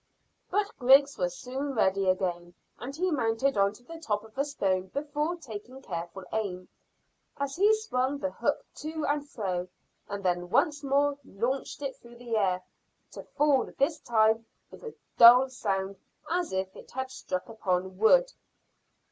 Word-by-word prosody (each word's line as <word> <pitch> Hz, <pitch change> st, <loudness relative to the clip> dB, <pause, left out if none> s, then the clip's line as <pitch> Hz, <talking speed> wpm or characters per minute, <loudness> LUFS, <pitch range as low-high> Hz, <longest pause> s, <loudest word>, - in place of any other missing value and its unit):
But 415 Hz, +2 st, 0 dB
Griggs 275 Hz, +3 st, +6 dB
was 175 Hz, -1 st, -1 dB
soon 270 Hz, +4 st, -4 dB
ready 195 Hz, -3 st, +2 dB
again, 175 Hz, -2 st, -1 dB, 0.2 s
and 270 Hz, +3 st, -6 dB
he 365 Hz, +3 st, 0 dB
mounted 260 Hz, 0 st, +1 dB
on 200 Hz, 0 st, +3 dB
to 245 Hz, -, -17 dB
the 330 Hz, +5 st, -10 dB
top 210 Hz, -9 st, -2 dB
of 220 Hz, 0 st, -16 dB
a 275 Hz, -, +1 dB
stone 190 Hz, -10 st, -1 dB
before 295 Hz, -, -2 dB
taking 255 Hz, -4 st, -9 dB
careful 175 Hz, -4 st, -6 dB
aim, 190 Hz, -4 st, -3 dB, 0.7 s
as 275 Hz, -1 st, -3 dB
he 405 Hz, +4 st, +5 dB
swung 275 Hz, -, -1 dB
the 285 Hz, 0 st, -3 dB
hook -, -, -1 dB
to 310 Hz, 0 st, -4 dB
and 290 Hz, 0 st, -1 dB
fro, 185 Hz, -8 st, -3 dB, 0.4 s
and 200 Hz, -1 st, -5 dB
then 175 Hz, 0 st, 0 dB
once 295 Hz, +8 st, +2 dB
more 280 Hz, +1 st, +2 dB
launched 250 Hz, +7 st, -3 dB
it 275 Hz, -1 st, -3 dB
through 235 Hz, 0 st, -15 dB
the 240 Hz, -1 st, -4 dB
air, 185 Hz, -4 st, +1 dB, 0.5 s
to -, -, -8 dB, 0.2 s
fall 290 Hz, -2 st, +3 dB
this 300 Hz, +3 st, +1 dB
time 225 Hz, -2 st, +2 dB, 0.2 s
with -, -, -13 dB
a 460 Hz, -, -8 dB, 0.2 s
dull 250 Hz, +3 st, +9 dB
sound 195 Hz, -5 st, -2 dB, 0.3 s
as 350 Hz, 0 st, 0 dB
if 190 Hz, 0 st, -2 dB
it -, -, -13 dB
had 260 Hz, 0 st, -4 dB
struck 185 Hz, -7 st, -4 dB
upon 185 Hz, -4 st, -2 dB
wood. -, -, +5 dB
245 Hz, 165 wpm, -29 LUFS, 195-285 Hz, 0.7 s, dull